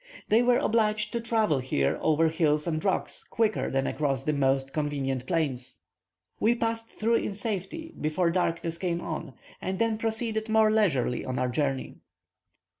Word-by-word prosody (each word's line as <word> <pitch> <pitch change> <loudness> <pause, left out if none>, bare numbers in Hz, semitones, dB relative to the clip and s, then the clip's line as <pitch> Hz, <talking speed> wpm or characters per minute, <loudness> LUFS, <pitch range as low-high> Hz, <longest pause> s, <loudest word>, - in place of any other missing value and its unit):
They 220 +3 +5
were 245 0 +4
obliged 215 -1 +1
to 235 - -1
travel 220 - +1
here 70 - 0
over 160 +1 +3
hills 155 -2 +2
and 155 -2 -1
rocks 195 - 0
quicker 220 -2 0
than 135 0 0
across 140 -5 -1
the 150 - 0
most 135 -1 +1
convenient 135 -4 -2
plains. 130 - -2 0.6
We 230 +3 +3
passed 225 -1 -2
through 230 +2 +1
in 200 - -3
safety 220 - -4
before 170 +3 +1
darkness 170 -1 -1
came 175 -2 -1
on, 155 -5 -5 0.3
and 190 +1 -2
then 225 +1 +1
proceeded 220 -1 -1
more 220 0 +4
leisurely 155 - +1
on 130 -1 -3
our 130 - 0
journey. 135 0 -2
170 Hz, 160 wpm, -28 LUFS, 140-220 Hz, 0.6 s, They